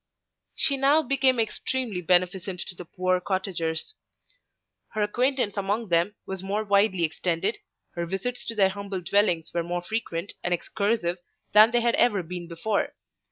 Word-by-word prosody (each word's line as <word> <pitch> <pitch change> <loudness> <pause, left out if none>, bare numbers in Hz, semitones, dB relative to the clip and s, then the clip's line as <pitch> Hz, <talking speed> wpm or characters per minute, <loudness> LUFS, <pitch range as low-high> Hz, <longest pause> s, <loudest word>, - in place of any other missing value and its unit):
She 280 -3 +1
now 285 +4 +4
became 265 -2 +2
extremely 225 -2 -2
beneficent 180 +1 +1
to - - -6
the 180 0 -9
poor 185 +2 0
cottagers. 185 - -2 1.0
Her 215 - +2
acquaintance 245 0 0
among 200 +2 -1
them 175 +5 +2
was 190 -1 -5
more 200 +3 -1
widely 200 -3 +3
extended, 165 +5 -1 0.3
her 170 0 -4
visits 215 +7 -3
to 230 - -4
their 195 -3 +4
humble 200 -1 -5
dwellings 175 -2 +2
were 170 - +1
more 175 +1 -3
frequent 190 -3 -3
and 175 0 +2
excursive 200 -1 -1 0.3
than 215 +2 +8
they 240 0 +2
had 235 0 +2
ever 205 -6 +3
been 175 +1 -6
before. 175 +5 -1
195 Hz, 155 wpm, -26 LUFS, 175-220 Hz, 1.0 s, than